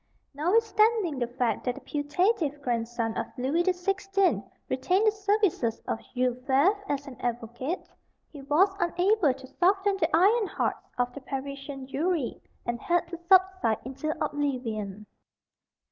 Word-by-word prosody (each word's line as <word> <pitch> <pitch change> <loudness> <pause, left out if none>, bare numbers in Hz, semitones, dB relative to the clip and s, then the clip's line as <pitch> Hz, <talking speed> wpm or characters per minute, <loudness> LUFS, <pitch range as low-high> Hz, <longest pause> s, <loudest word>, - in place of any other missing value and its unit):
Notwithstanding 425 - +2
the 240 - 0
fact 245 -1 -1
that 250 -1 0
the - - -10
putative 295 +1 0
"grandson" 230 -2 -1
of - - -2
Louis 270 +7 +1
the 370 - +3
Sixteenth 390 +1 +1 0.2
retained 365 +11 +1
the 430 - +5
services 405 - +1
of - - -1 0.2
Jules 250 0 +1
Favre 275 +9 +3
as 280 -1 -1
an 270 -4 -11
advocate, 240 +7 -3 0.4
he 290 - -10
was 335 +8 +3
unable 350 -1 +3
to 265 0 -12
soften 390 +2 +3
the - - +1
iron 405 +6 +4
hearts - - -2
of 245 0 0
the 285 - -8
Parisian 275 0 -6
jury, 300 +1 -1 0.2
and 235 0 -2
had 345 -1 +1
to 340 - -5
subside 375 - +4
into 270 +4 -4 0.2
oblivion. 230 -9 -3
290 Hz, 145 wpm, -28 LUFS, 255-375 Hz, 0.4 s, the